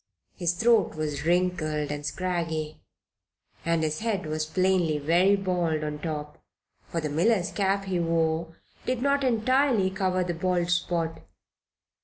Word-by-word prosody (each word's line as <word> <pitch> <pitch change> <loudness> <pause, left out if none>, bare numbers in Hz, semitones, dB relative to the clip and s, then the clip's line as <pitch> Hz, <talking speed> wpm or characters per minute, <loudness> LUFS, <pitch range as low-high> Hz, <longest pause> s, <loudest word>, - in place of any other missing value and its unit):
His 175 -2 0
throat 225 +2 +3
was 150 -1 -3
wrinkled 170 -4 +1
and 145 0 -4
scraggy 160 -2 -2 0.8
and 165 -1 +1
his 155 0 -1
head 215 -5 -1
was 155 0 -2
plainly 185 -3 +2
very 175 +7 +3
bald 175 -5 -1
on 150 0 -4
top, 150 -2 -5 0.5
for 170 - -2
the 155 - -2
miller's 185 +4 +2
cap 195 0 0
he 185 -2 -1
wore 165 0 0 0.3
did 255 -1 0
not 280 0 +2
entirely 250 -3 +2
cover 185 -1 0
the 175 -1 -2
bald 175 0 0
spot. 170 -2 0
175 Hz, 140 wpm, -27 LUFS, 155-190 Hz, 0.8 s, throat